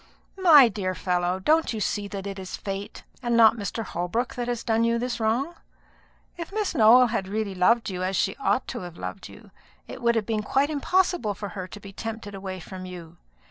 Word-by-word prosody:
"My 310 -8 +8
dear 195 -4 -3
fellow, 180 0 0
don't 315 +8 +2
you 220 - -3
see 205 0 -1
that 200 -1 -6
it 195 -1 -5
is 185 -1 -6
fate, 195 0 -6 0.2
and 240 -2 +1
not 225 -1 +7
Mr. 225 +1 -4
Holbrook, 185 +7 -2
that 245 -1 -4
has 240 -2 -2
done 225 -1 +1
you 230 0 +2
this 240 0 -3
wrong? 235 +9 0 0.8
If 335 +1 -6
Miss 425 -1 -1
Nowell 245 -1 +6
had 205 -4 -2
really 210 0 -2
loved 225 +6 +3
you 180 -1 -4
as 185 +1 -1
she 195 +2 +1
ought 265 -1 0
to 245 - -4
have 175 -3 -9
loved - - -7
you, - - -15 0.4
it - - -9
would 235 -1 +2
have 220 -2 0
been 220 -1 -1
quite 270 +8 +1
impossible 320 - +1
for 205 0 -6
her 190 -2 -6
to 205 - -10
be 200 -1 -11
tempted 225 -1 -6
away 190 -1 -6
from 185 +1 -8
you. 175 -2 -10
215 Hz, 215 wpm, -25 LUFS, 190-240 Hz, 0.8 s, My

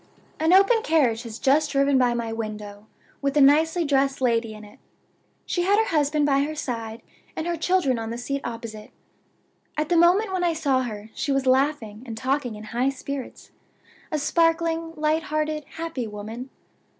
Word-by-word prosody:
"An 320 +2 +2
open 395 +5 +5
carriage 270 - +2
has 230 -2 -8
just 295 +4 +2
driven 275 -1 +3
by 245 -1 +2
my 230 -1 -3
window, 210 -2 -6 0.3
with 280 +1 0
a - - +6
nicely 320 +5 +4
dressed 275 -1 +1
lady 230 -3 0
in 215 - -11
it. 205 - -17 0.7
She 350 - -1
had 395 +3 +3
her 445 - +3
husband 300 -1 +2
by 275 -1 +3
her 305 +2 -2
side, 230 -5 -5 0.3
and 320 - -3
her 345 0 -1
children 325 -7 +1
on 225 0 -4
the 230 - -4
seat 275 +3 -3
opposite. 230 -2 -7 0.9
At 305 0 -1
the 350 - +3
moment 375 +4 +4
when 370 -1 0
I 345 -1 +2
saw 280 -5 +1
her 215 -3 -6
she 285 - -2
was 275 -1 +1
laughing 260 -5 +1
and 225 -1 -6
talking 260 -2 -1
in 210 - -9
high 250 +3 +2
spirits 275 0 -7 0.6
a 310 - 0
sparkling, 330 +1 +1
light 310 +1 +1
hearted, 305 0 -2
happy 325 -8 -4
woman. 220 +5 -7
275 Hz, 180 wpm, -24 LUFS, 235-320 Hz, 0.9 s, a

